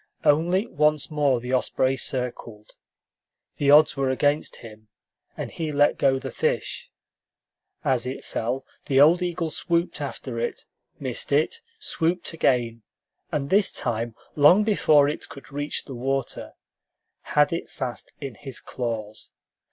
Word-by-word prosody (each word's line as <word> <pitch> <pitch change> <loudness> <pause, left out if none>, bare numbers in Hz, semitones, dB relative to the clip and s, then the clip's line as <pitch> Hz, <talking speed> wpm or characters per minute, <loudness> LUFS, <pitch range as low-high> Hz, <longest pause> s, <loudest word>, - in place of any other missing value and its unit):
Only 175 +7 +3
once 150 -4 +1
more 145 -4 +2
the 125 +2 -5
osprey 130 +1 +1
circled. 120 -5 -4 0.9
The 140 - +1
odds 150 +1 +7
were 135 -1 0
against 145 +3 +1
him, 110 -1 -13 0.5
and - - -5
he 160 -2 -3
let 145 0 +3
go 135 -1 +3
the - - -6
fish. - - -2 1.0
As 125 -2 +1
it 130 - -5
fell, 125 +4 -3 0.2
the 135 -1 +3
old 165 +5 +6
eagle 170 -2 -2
swooped 170 +2 -1
after - - -5
it, 480 -1 -3 0.3
missed - - -4
it, 460 - +1 0.2
swooped 170 - -1
again, 120 -7 +1 0.5
and 140 -2 -2
this 200 0 +4
time, 115 -1 -2 0.2
long 155 +8 +6
before 155 -9 +4
it 150 - -4
could 140 0 -12
reach 145 +1 -3
the 135 - -8
water, 135 +1 -3 0.8
had 150 +2 +5
it 170 - -4
fast 130 -5 -6
in 135 -4 -6
his 135 +3 -7
claws. 110 -4 -5
140 Hz, 140 wpm, -25 LUFS, 125-160 Hz, 1.0 s, odds